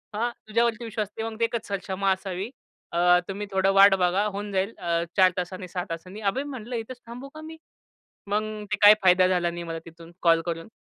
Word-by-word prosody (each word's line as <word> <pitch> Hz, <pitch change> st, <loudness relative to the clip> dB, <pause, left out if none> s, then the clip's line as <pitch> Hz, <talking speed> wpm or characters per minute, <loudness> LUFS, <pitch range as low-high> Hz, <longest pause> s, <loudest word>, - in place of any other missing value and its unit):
हां, 235 Hz, +3 st, 0 dB, 0.2 s
तुझ्यावरती 230 Hz, +1 st, +1 dB
विश्वास 215 Hz, -2 st, -3 dB
असते 220 Hz, +2 st, -7 dB
मग 225 Hz, 0 st, -5 dB
ते 230 Hz, -, +4 dB
एकच 230 Hz, -1 st, -4 dB
सक्षमा 195 Hz, 0 st, -1 dB
असावी 190 Hz, +2 st, -3 dB, 0.4 s
अ, 175 Hz, +1 st, +5 dB
तुम्ही 200 Hz, +1 st, -4 dB
थोडं 190 Hz, 0 st, +2 dB
वाट 195 Hz, 0 st, +8 dB
बघा 185 Hz, +2 st, +2 dB
होऊन 205 Hz, 0 st, -4 dB
जाईल 195 Hz, +3 st, 0 dB
अ, 170 Hz, -1 st, 0 dB
4 185 Hz, -1 st, +6 dB
तासांनी 180 Hz, +1 st, -4 dB
6 180 Hz, 0 st, -3 dB
तासांनी. 185 Hz, +5 st, -7 dB
अबे 210 Hz, +8 st, 0 dB
म्हटलं 250 Hz, -4 st, -6 dB
इथेच 240 Hz, +2 st, -6 dB
थांबू 250 Hz, +4 st, -8 dB
का 310 Hz, -, -8 dB
मी? 320 Hz, +1 st, -9 dB, 0.7 s
मग 210 Hz, +2 st, 0 dB, 0.3 s
ते 210 Hz, -, +1 dB
काय 205 Hz, +1 st, +10 dB
फायदा 185 Hz, 0 st, +6 dB
झाला 175 Hz, -2 st, +1 dB
नाही 170 Hz, 0 st, -6 dB
मला 165 Hz, -1 st, -5 dB
तिथून 165 Hz, 0 st, -13 dB
कॉल 165 Hz, -1 st, +4 dB
करून. 165 Hz, -1 st, -4 dB
195 Hz, 205 wpm, -26 LUFS, 180-220 Hz, 0.7 s, काय